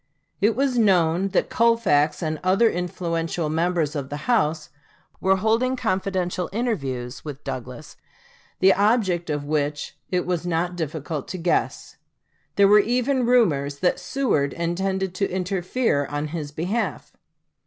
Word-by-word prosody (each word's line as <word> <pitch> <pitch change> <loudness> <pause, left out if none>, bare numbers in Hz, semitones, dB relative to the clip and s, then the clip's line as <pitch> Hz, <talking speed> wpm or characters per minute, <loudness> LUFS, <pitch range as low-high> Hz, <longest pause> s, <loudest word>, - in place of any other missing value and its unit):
It 215 +2 +3
was 260 -1 +1
known 180 -3 +3
that 195 - 0
Colfax 195 -10 +2
and 155 -1 -2
other 195 +5 +4
influential 170 -3 -2
members 165 -1 0
of 140 -2 -4
the 145 0 -6
House 160 -10 +1 0.5
were 190 0 +3
holding 225 +6 +1
confidential 185 -5 -1
interviews 140 - -3
with 145 -2 -8
Douglas, 130 +4 -7 0.6
the 190 +1 +5
object 195 -5 +1
of 145 -1 -2
which 145 -1 -2
it 180 -1 0
was 175 -2 -1
not 175 +1 -1
difficult 155 -2 -4
to 185 - -5
guess. 170 0 -1 0.6
There 200 0 +5
were 210 +1 +7
even 250 +3 +1
rumors 145 - +2
that 180 - +2
Seward 205 - 0
intended 190 +2 -2
to 195 +2 -1
interfere 185 - 0
in 145 +2 -4
his 150 -2 -5
behalf. 180 +10 -3
180 Hz, 135 wpm, -23 LUFS, 150-200 Hz, 0.6 s, were